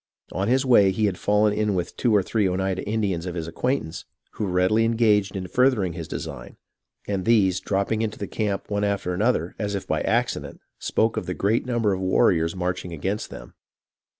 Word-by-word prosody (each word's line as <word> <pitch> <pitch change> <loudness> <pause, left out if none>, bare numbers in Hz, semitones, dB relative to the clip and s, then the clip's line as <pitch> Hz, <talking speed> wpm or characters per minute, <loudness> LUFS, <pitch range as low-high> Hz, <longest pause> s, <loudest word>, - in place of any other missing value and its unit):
On 95 +4 -1
his 130 +3 +2
way 110 -7 +6
he 105 +3 +1
had 95 -3 -1
fallen 105 0 +3
in 105 -1 0
with 90 -2 -3
two 120 - +1
or 100 - +4
three 105 -1 +1
Oneida 95 0 -1
Indians 100 -5 -1
of 90 - -4
his 85 -2 -4
acquaintance, 125 -1 -2 0.3
who 105 - -3
readily 95 +5 +2
engaged 110 -4 +2
in 95 -1 -3
furthering 120 -7 +2
his 85 -2 -6
design, - - -7 0.5
and 100 -2 -1
these, 95 -5 +3
drop 100 +1 -1
ping 110 0 0
into 110 -1 -2
the 100 - -4
camp 100 -1 -2
one 100 0 0
after 100 -3 -1
another, 90 -3 0
as 105 -2 -2
if 95 - -4
by - - -1
accident, - - -1 0.2
spoke 110 0 0
of 90 - -3
the 90 - -3
great 110 +5 0
number 115 -5 +1
of 95 - -3
warriors 90 -3 +2
marching 90 -1 -3
against 95 +6 -3
them. - - -10
100 Hz, 200 wpm, -24 LUFS, 90-110 Hz, 0.5 s, way